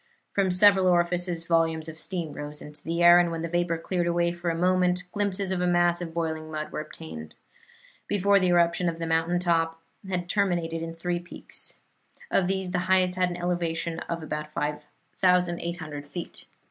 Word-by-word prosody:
From 195 -2 +2
several 190 +1 +5
orifices 175 -1 +1
volumes 165 -1 +1
of 160 0 -8
steam 170 -5 -3
rose 150 +1 -7
into 150 0 -10
the 170 +2 -1
air, 175 0 +9
and 175 -1 +2
when 165 -1 -4
the - - -1
vapor 175 0 0
cleared 175 +1 -1
away 170 0 +1
for 175 0 -3
a 165 - -1
moment 180 0 +2
glimpses 200 -2 -1
of 185 -1 -1
a 180 - +1
mass 175 0 +3
of 170 -2 -5
boiling 160 -1 -3
mud 155 -1 -5
were - - -4
obtained. 80 - -9 0.7
Before 200 0 +3
the 185 - +2
eruption 175 0 +3
the 165 0 -4
mountain 165 +2 +1
top 165 -2 +1 0.3
had 180 -2 -2
terminated 175 -5 0
in 165 0 -5
three 175 +1 -2
peaks. 175 - -2 0.6
Of 185 - +2
these 190 -1 -1
the 180 - 0
highest 185 -1 +4
had 180 0 +1
an 175 - -5
elevation 170 -2 -2
of 170 -1 -3
about 150 0 -5
5,800 170 0 -1
feet. 170 +3 -8
175 Hz, 180 wpm, -26 LUFS, 165-180 Hz, 0.7 s, air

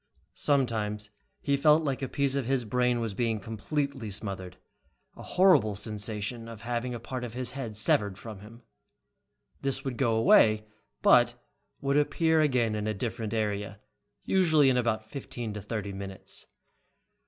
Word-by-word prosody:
Sometimes 110 -7 0 0.3
he 140 - +1
felt 150 +3 +4
like 140 -2 -2
a 135 - -1
piece 140 -2 +1
of 135 -4 -1
his 130 -3 +1
brain 125 +1 +1
was 115 -3 -2
being 115 +1 0
completely 120 +4 -3
smothered, 95 -2 -5 0.6
a - - -11
horrible 180 - +4
sensation 105 +2 -4
of 115 -2 -9
having 120 +2 -3
a - - -5
part 125 +2 -5
of 120 -1 -6
his 125 0 -2
head 130 -6 -5
severed 105 -3 +2
from 110 -3 -9
him. 115 +4 -14 1.0
This 135 0 -2
would 130 -3 -3
go 120 -4 +2
away, 110 -1 +5 0.4
but - - +5 0.5
would 140 +1 +1
appear 160 +2 +3
again 125 -7 +2
in 105 0 -2
a 110 - -1
different 115 0 -3
area, 105 -2 -2 0.4
usually 160 -7 +4
in - - +1
about 115 -3 0
fifteen 120 -3 -6
to 105 - -6
thirty 105 -1 -4
minutes. 95 0 -8
115 Hz, 155 wpm, -28 LUFS, 105-135 Hz, 1.0 s, away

